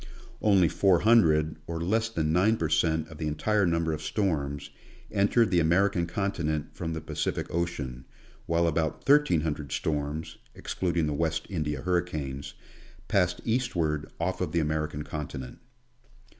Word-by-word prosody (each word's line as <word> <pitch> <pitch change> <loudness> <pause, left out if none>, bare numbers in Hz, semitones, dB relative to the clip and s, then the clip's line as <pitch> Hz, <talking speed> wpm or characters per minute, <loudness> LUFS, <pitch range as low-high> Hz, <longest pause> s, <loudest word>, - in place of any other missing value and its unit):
Only 100 -5 +5
four 95 +2 +3
hundred, 80 -9 +4
or 85 -1 -3
less 110 +7 +1
than 80 -8 -1
9 105 +6 +3
per 80 -5 -1
cent, 80 0 +1
of 80 - -11
the 80 - -2
entire 100 +6 +1
number 85 -1 +1
of 75 - -4
storms, 80 -5 -2 0.4
entered 100 +1 +3
the 90 - +4
American 85 +1 +2
continent 85 -5 -2
from 80 -2 -3
the 80 - -4
Pacific - - -2
ocean, 70 -7 -3 0.4
while 85 0 +2
about 80 -1 0
thirteen 145 - +4
hundred 75 -3 -3
storms, 75 +1 -3 0.2
excluding 85 -3 -1
the 75 - -1
West 80 +1 -1
India 75 -6 -2
hurricanes, 80 -7 -2 0.5
passed 90 -3 +1
eastward 85 - 0
off 90 +2 -1
of - - -2
the 85 - +3
American 75 -1 -1
continent. 75 -4 -6
80 Hz, 145 wpm, -28 LUFS, 75-90 Hz, 0.5 s, Only